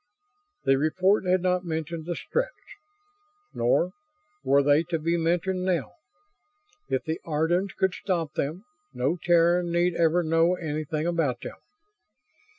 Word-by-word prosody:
The 135 0 +3
report 185 +7 +2
had 180 0 +2
not 180 0 +1
mentioned 160 -1 -4
the 175 - -2
Stretts. - - -2 1.0
Nor 125 +9 +1 0.5
were 140 +1 +4
they 145 +2 +4
to 170 0 -1
be 165 +2 0
mentioned 175 +2 0
now. 185 -2 -1 1.0
If - - 0
the 160 -1 -4
Ardans 175 +5 0
could 190 -1 +1
stop 170 -6 -2
them, 155 +8 -3 0.3
no 135 +7 0
Terran 175 0 +3
need 175 +1 +2
ever 170 +1 +2
know 165 +2 +3
anything 155 -2 -3
about 160 -8 0
them. - - -8
170 Hz, 135 wpm, -26 LUFS, 155-180 Hz, 1.0 s, were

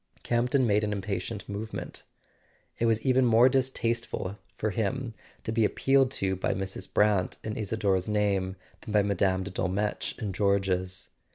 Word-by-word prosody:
Campton 125 +2 +2
made 105 -1 +3
an 105 0 0
impatient 100 0 -4
movement. 105 +2 -5 0.8
It 115 - +2
was 110 -1 +1
even 130 0 +4
more 120 0 +6
distasteful 120 -6 -1 0.2
to 110 - 0
him 115 +4 -2 0.3
to - - -2
be 110 0 +2
appealed 135 +4 +3
to 95 -4 0
by 95 - -1
Mrs. 95 0 -5
Brant 105 -3 +2
in 110 - -3
Isador's 100 -3 0
name 100 -3 +1 0.3
than 105 - -6
by 105 -1 +5
Mme. 95 -1 +1
de 100 - -6
Dolmetsch 95 +3 -1
in 100 -3 -3
George's. 95 -2 0
105 Hz, 155 wpm, -28 LUFS, 95-115 Hz, 0.8 s, more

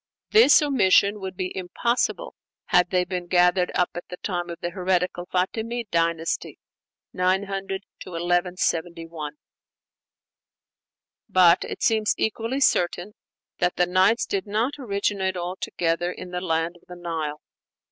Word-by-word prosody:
This 425 -9 +7
omission 210 -6 +3
would 190 -1 -6
be 185 -1 -3
impossible 215 +7 -1 0.4
had 180 0 +4
they 180 -1 +1
been 180 -1 -4
gathered 180 0 +3
up 180 - +1
at 175 - -7
the 180 - -7
time 175 -3 -3
of 170 - -7
the 175 - -3
heretical 180 -1 -1
Fatimide 220 +5 -2
dynasty 165 -1 -1 0.6
(900 195 +1 -1 0.2
1171). 170 -3 -2 2.0
But 180 -1 +5
it - - -6
seems 220 -1 +2
equally 230 +5 -1
certain 180 -3 +1 0.5
that 180 0 +1
the 180 - +3
'Nights' 185 +6 +3
did 195 0 -3
not 220 +7 0
originate 200 -5 -1
altogether 175 -1 -2
in 180 0 -9
the 180 0 -3
land 165 0 -1
of - - -27
the 180 - -9
Nile. 160 -4 -4
180 Hz, 125 wpm, -24 LUFS, 175-200 Hz, 2.0 s, This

